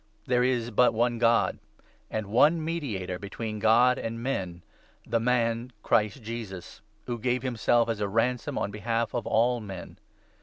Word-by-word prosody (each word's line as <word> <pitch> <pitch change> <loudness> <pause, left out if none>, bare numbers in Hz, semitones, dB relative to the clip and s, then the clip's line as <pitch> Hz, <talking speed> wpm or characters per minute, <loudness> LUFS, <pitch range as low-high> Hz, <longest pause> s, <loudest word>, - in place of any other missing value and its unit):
There 125 -1 +2
is 120 -2 0
but 120 +2 +4
one 120 +1 +1
God, 115 0 +3 0.2
5 - - -31 0.3
and 110 -1 -3
one 150 +10 +3
mediator 110 - -3
between 110 +2 -5
God 120 +4 +4
and 115 0 -4
men 90 -10 -3 0.2
— - - -33
the 115 - 0
man, 120 0 0
Christ 110 +4 +1
Jesus, 105 -6 -7 0.2
who 120 -1 -4
gave 125 +2 0
himself 120 -1 +2
as 115 -2 -2
a 105 - 0
ransom 115 +4 0
on 100 - -1
behalf 115 +2 -2
of 120 - -3
all 120 +2 +2
men. 95 -4 -9
115 Hz, 165 wpm, -27 LUFS, 105-125 Hz, 0.3 s, but